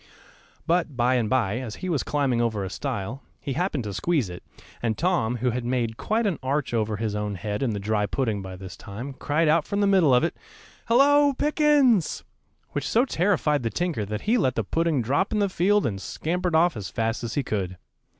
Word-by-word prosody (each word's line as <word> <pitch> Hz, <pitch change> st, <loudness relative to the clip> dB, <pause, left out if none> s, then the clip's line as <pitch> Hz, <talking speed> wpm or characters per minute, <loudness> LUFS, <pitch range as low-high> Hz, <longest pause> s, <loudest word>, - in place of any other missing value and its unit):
But 165 Hz, -5 st, 0 dB
by 125 Hz, +1 st, +3 dB
and 120 Hz, -4 st, +1 dB
by, 120 Hz, -3 st, +1 dB
as 120 Hz, -4 st, -6 dB
he 185 Hz, -, -6 dB
was 160 Hz, -6 st, 0 dB
climbing 135 Hz, -5 st, 0 dB
over 110 Hz, -4 st, 0 dB
a 95 Hz, -, -5 dB
stile, 130 Hz, -1 st, -4 dB, 0.2 s
he 140 Hz, -, -4 dB
happened 160 Hz, -4 st, -1 dB
to 105 Hz, -2 st, -5 dB
squeeze 140 Hz, -, 0 dB
it, 90 Hz, -, -8 dB, 0.4 s
and 115 Hz, -2 st, -1 dB
Tom, 165 Hz, -10 st, +1 dB
who 125 Hz, +1 st, 0 dB
had 125 Hz, +1 st, -3 dB
made 120 Hz, -2 st, -1 dB
quite 220 Hz, -, 0 dB
an 195 Hz, -6 st, 0 dB
arch 135 Hz, 0 st, -1 dB
over 110 Hz, -2 st, 0 dB
his 110 Hz, -1 st, -2 dB
own 105 Hz, -1 st, -2 dB
head 105 Hz, +3 st, -4 dB
in 135 Hz, -, +1 dB
the 105 Hz, -2 st, -2 dB
dry 105 Hz, 0 st, 0 dB
pudding 110 Hz, -3 st, -1 dB
by 95 Hz, -1 st, -7 dB
this 95 Hz, 0 st, -9 dB
time, 120 Hz, +7 st, -7 dB
cried 150 Hz, +4 st, 0 dB
out 155 Hz, +1 st, +4 dB
from 200 Hz, -, -1 dB
the 205 Hz, -, +3 dB
middle 190 Hz, -7 st, +4 dB
of 125 Hz, -, +3 dB
it, 170 Hz, -, 0 dB, 0.5 s
"Hallo, 285 Hz, +4 st, +5 dB
Pickens!" 290 Hz, -, +3 dB, 0.5 s
which -, -, -3 dB
so 235 Hz, +4 st, +3 dB
terrified 170 Hz, -, +1 dB
the 115 Hz, -, -1 dB
tinker 160 Hz, -, -1 dB
that 105 Hz, +2 st, -4 dB
he 235 Hz, +3 st, +2 dB
let 130 Hz, -, +1 dB
the 115 Hz, -, 0 dB
pudding 160 Hz, -, 0 dB
drop 145 Hz, -, +1 dB
in 215 Hz, -, 0 dB
the 205 Hz, -1 st, +2 dB
field 200 Hz, +3 st, +2 dB
and 95 Hz, -4 st, -2 dB
scampered 175 Hz, -, -2 dB
off 170 Hz, -1 st, +4 dB
as 100 Hz, -4 st, -5 dB
fast 115 Hz, +2 st, -2 dB
as 115 Hz, -1 st, -4 dB
he 145 Hz, -, +1 dB
could. 95 Hz, -6 st, -3 dB
130 Hz, 220 wpm, -25 LUFS, 110-175 Hz, 0.5 s, Hallo